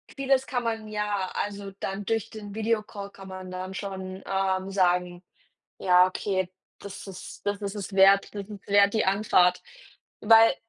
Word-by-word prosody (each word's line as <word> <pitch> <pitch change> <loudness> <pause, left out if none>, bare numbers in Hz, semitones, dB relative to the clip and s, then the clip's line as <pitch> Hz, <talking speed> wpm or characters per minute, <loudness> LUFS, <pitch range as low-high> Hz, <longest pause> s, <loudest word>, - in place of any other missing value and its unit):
Vieles 270 -1 +1
kann 245 -2 -2
man 225 -2 -2
ja 210 -3 -2
also, 200 -1 -4
dann 195 +1 -4
durch 225 +1 -1
den 210 -2 -9
Videocall 215 -2 -2
kann 195 -1 -12
man 185 -1 -8
dann 185 +1 -5
schon, 190 -1 -6
ähm, 190 0 -1
sagen: 180 -2 +1 0.6
„Ja, 180 -1 +5
okay, 185 0 -2 0.3
das 200 0 -9
ist 190 +1 -10
das 205 0 -1
ist 200 0 -3
es 200 -1 -6
wert, 195 +1 +6
das 200 -1 -5
ist 205 -2 -10
wert 200 0 +5
die 220 - +2
Anfahrt.“ 190 -2 +3 0.6
Weil 225 +3 +7
200 Hz, 165 wpm, -27 LUFS, 190-210 Hz, 0.6 s, Weil